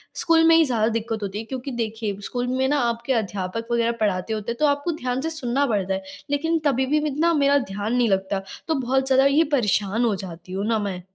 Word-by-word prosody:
School 325 -1 +3
में 330 - +7
ही 325 -1 +6
ज़्यादा 225 -4 +1
दिक्कत 225 -1 -2
होती 200 +1 -4
है। - - -4
क्योंकि 260 +2 -5
देखिए 220 -3 -3
स्कूल 245 +3 -3
में 260 +1 +1
ना 290 +1 +2
आपके 235 +3 -2
अध्यापक 205 0 -3
वगैरह 235 0 +2
पढ़ाते 205 0 0
होते 215 +2 -3
हैं 235 - -5
तो 305 - +3
आपको 285 +4 0
ध्यान 255 -4 -3
से 320 - -2
सुनना 280 -3 0
पड़ता 195 -5 0
है 190 0 -3 0.3
लेकिन 325 +3 +1
तभी 265 -2 +2
भी 295 +4 +1
इतना 315 +4 +1
मेरा 285 -1 +4
ध्यान 205 +4 -2
नहीं 240 -3 +2
लगता। 195 0 0 0.3
तो 320 - +1
बहुत 265 0 0
ज़्यादा 265 0 +4
ये 285 +4 +4
परेशान 210 -1 +1
हो 215 -3 +1
जाती 180 -1 -9
हूँ 200 +2 -2
ना 225 -1 +1
मैं। 195 -3 -3
235 Hz, 230 wpm, -23 LUFS, 210-275 Hz, 0.3 s, में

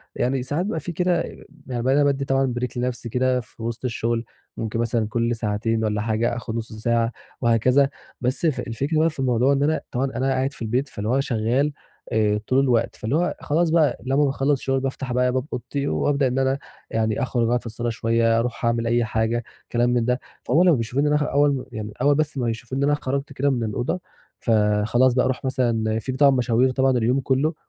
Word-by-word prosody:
يعني 130 0 0
ساعات 155 +7 -1
بيبقى 160 -6 -2
في 175 - -5
كده 180 +1 +1
آآ، - - -8 0.2
يعني 120 -2 -3
ما 130 +1 +3
أنا 145 0 +4
بادّي 140 -1 +1
طبعًا 135 -2 +1
break 125 0 -4
لنفسي 120 -1 -2
كده 125 +1 +1
في 115 -1 -11
وسط 120 +2 -4
الشغل، 115 -1 -1 0.3
ممكن 115 0 -3
مثلًا 115 -2 0
كُلّ 115 +1 0
ساعتين 110 +1 -1
والَّا 105 -1 0
حاجة، 115 +2 0
آخُد 115 -2 -5
نص 115 -1 -4
ساعة 115 +1 0 0.3
وهكذا، 130 +4 +3 0.3
بس 130 +7 0
الف 155 - +1
الفكرة 140 +7 -1
بقى 165 +1 +4
في 150 - -10
الموضوع 130 +1 +3
إن 140 +1 +1
أنا 155 +2 +1
طبعًا 130 +2 0
أنا 130 +2 0
قاعد 135 +1 0
في - - -12
البيت 125 +5 -1
فاللي 105 +2 -4
هو 135 +2 +2
شغّال، 130 +4 0 0.4
آآ، 105 -1 +2
طول 130 +1 +3
الوقت، 120 -4 +2
فاللي 115 +7 -2
هو 175 +2 +1
خلاص 160 +3 +1
بقى 155 -5 +3
لمّا 140 +3 +3
باخلّص 135 +1 +1
الشغل 135 0 0
بافتح 135 -1 -3
بقى 125 0 +2
باب 130 +1 -1
أوضتي 140 +3 -3
وأبدأ 140 -2 +1
إن 130 +2 -1
أنا 135 +1 +1 0.3
يعني 110 +3 0
أخرُج 120 -3 0
أقعُد 120 +1 +2
في - - -18
الصالة 115 +1 -3
شويّة، 115 0 +2
أرُوح 120 0 -2
أعمل 115 0 +1
أي 120 0 +2
حاجة، 110 +2 0 0.3
كلام 120 +1 +2
من 120 -2 +1
ده، 125 +1 +1 0.2
فهم 170 +4 +3
لمّا 175 -5 +5
بيشوفوني 125 +5 0
إن 150 - +2
أنا - - +4
خ - - +3
أول 145 0 +3
م 130 - -5
يعني 105 -1 -6
أول 145 +1 +4
بس 155 -1 -1
ما 120 -2 0
يشوفوا 120 +3 -5
إن 140 - 0
أنا 145 +1 +3
خرجت 140 0 -3
كده 140 +2 +1
من 120 -4 0
الأوضة، 120 - -2 0.4
فخلاص 110 +3 +3
بقى، 125 - +2
رُوح 130 +1 -2
مثلًا 115 -4 0
في 130 - -4
طبعًا 140 +1 +5
مشاوير 125 0 +2
طبعًا 130 0 +2
اليوم 120 +4 +2
كلّه، 135 +5 +1
125 Hz, 220 wpm, -23 LUFS, 115-135 Hz, 0.4 s, لمّا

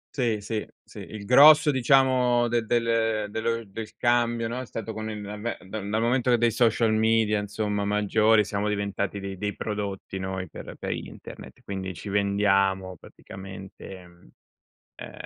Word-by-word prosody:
Sì, 115 -6 0
sì, 105 +1 -3 0.2
sì. - - -13
Il 105 -2 -9
grosso, 150 +5 +7
diciamo, 130 -2 +3
del 115 -1 -1
del 115 -3 0
dello 115 +1 -2
del 110 +2 -8
cambio, 120 -1 +1
no, 120 +3 -4
è 130 - -7
stato 110 0 -6
con 110 0 -5
il 105 - -5
l'avvent 105 0 -6
dal 100 +1 -6
momento 120 +3 +2
dei 120 0 +2
social 115 -1 +2
media 110 -1 +2
insomma 105 0 -2
maggiori, 105 +1 +3
siamo 100 0 -2
diventati 100 -1 -2
dei 95 -1 -7
dei 105 +1 -3
prodotti 100 -2 -5
noi 95 0 -4
per - - -9
per - - -4
internet. - - -9
Quindi 95 -2 -5
ci 100 - -8
vendiamo 95 -2 +1
praticamente, 95 +1 -11
mhmm, 85 -7 -20 0.7
ehm, - - -9
105 Hz, 155 wpm, -26 LUFS, 100-115 Hz, 0.7 s, grosso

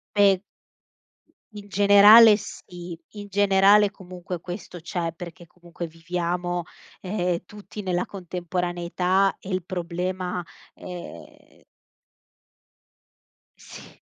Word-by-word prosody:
Beh 195 -2 +5 1.1
In 205 -1 -10
generale 205 +2 +8
sì, 175 -4 -9
in 205 -1 -9
generale 200 +1 +5
comunque 180 -3 -8
questo 175 0 -8
c'è, 170 -1 -3
perché 170 0 -10
comunque 170 0 -9
viviamo, 175 +1 -3 0.4
ehm, 180 -3 -2
tutti 210 0 -10
nella 180 -2 -1
contemporaneità 180 +1 -1
e - - -11
il 185 -2 -2
problema, 180 0 -4 0.3
ehm 180 -1 -11 1.9
Sì. - - -14
180 Hz, 90 wpm, -24 LUFS, 175-195 Hz, 1.9 s, generale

